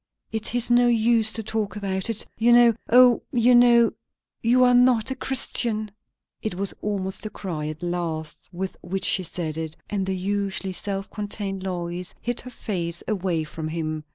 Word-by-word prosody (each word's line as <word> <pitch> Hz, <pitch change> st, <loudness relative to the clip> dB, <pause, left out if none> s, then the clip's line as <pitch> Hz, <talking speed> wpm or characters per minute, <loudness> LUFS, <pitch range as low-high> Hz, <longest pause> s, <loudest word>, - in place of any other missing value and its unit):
It 220 Hz, +2 st, -2 dB
is 245 Hz, 0 st, +1 dB
no 245 Hz, 0 st, +5 dB
use 230 Hz, -1 st, +3 dB
to 225 Hz, -, -3 dB
talk 215 Hz, -2 st, -2 dB
about 195 Hz, -1 st, -2 dB
it. 225 Hz, -2 st, -1 dB
You 230 Hz, +2 st, +3 dB
know 240 Hz, -1 st, +7 dB, 0.2 s
O, 245 Hz, 0 st, +6 dB
you 245 Hz, 0 st, +4 dB
know 240 Hz, -1 st, +6 dB, 0.5 s
you 245 Hz, +2 st, +4 dB
are 250 Hz, 0 st, +5 dB
not 245 Hz, 0 st, +4 dB
a -, -, -2 dB
Christian!" 225 Hz, -5 st, -1 dB, 0.5 s
It 215 Hz, -4 st, -3 dB
was 195 Hz, +1 st, -1 dB
almost 195 Hz, -2 st, -3 dB
a -, -, -6 dB
cry 165 Hz, -8 st, -5 dB
at 155 Hz, +2 st, -6 dB
last 165 Hz, -3 st, -3 dB
with 185 Hz, +2 st, -4 dB
which 190 Hz, +2 st, -3 dB
she 190 Hz, -, +3 dB
said 160 Hz, -3 st, -4 dB
it; 160 Hz, -1 st, -5 dB, 0.2 s
and 195 Hz, -2 st, -1 dB
the 190 Hz, -1 st, -1 dB
usually 195 Hz, 0 st, -2 dB
self 195 Hz, +1 st, -3 dB
contained 205 Hz, -2 st, -4 dB
Lois 180 Hz, -1 st, -4 dB
hid 240 Hz, 0 st, -2 dB
her 250 Hz, -, -9 dB
face 175 Hz, -8 st, -4 dB
away 185 Hz, -6 st, -1 dB
from 155 Hz, +1 st, -6 dB
him. 155 Hz, -1 st, -3 dB
200 Hz, 180 wpm, -24 LUFS, 180-235 Hz, 0.5 s, know